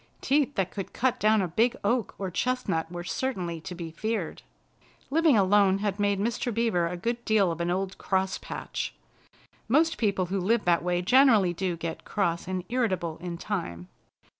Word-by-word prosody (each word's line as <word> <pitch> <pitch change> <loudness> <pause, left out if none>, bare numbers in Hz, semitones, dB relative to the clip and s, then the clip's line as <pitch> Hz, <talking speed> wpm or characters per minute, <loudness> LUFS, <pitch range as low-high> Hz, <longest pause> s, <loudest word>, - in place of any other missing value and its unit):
Teeth 285 0 +1
that 190 -2 0
could 195 -3 -6
cut 255 0 0
down 215 -1 +4
a - - -1
big 225 +8 +2
oak 230 +1 0
or 190 -2 -4
chestnut 180 -7 -1
were 175 0 -5
certainly 175 -4 -3
to 180 +2 -7
be 170 -2 -6
feared. 215 0 -3 0.7
Living 315 -4 +4
alone 195 0 +4
had 205 0 -2
made 200 -1 +1
Mr. 235 +3 -1
Beaver 220 -7 +1
a 180 +1 -4
good 235 +6 -2
deal 205 -6 +3
of 165 +1 -4
an 170 - 0
old 190 +1 -2
cross 190 0 0
patch. - - -5 0.7
Most 315 +7 +3
people 200 -4 +1
who 195 +3 -2
live 220 +4 +1
that 170 -1 +3
way 175 0 0
generally 225 -5 +5
do 180 -1 -2
get 165 0 -5
cross 175 -5 -1
and 185 -1 -2
irritable 190 -10 -1
in 175 -1 -5
time. 130 - -4
195 Hz, 180 wpm, -27 LUFS, 175-230 Hz, 0.7 s, generally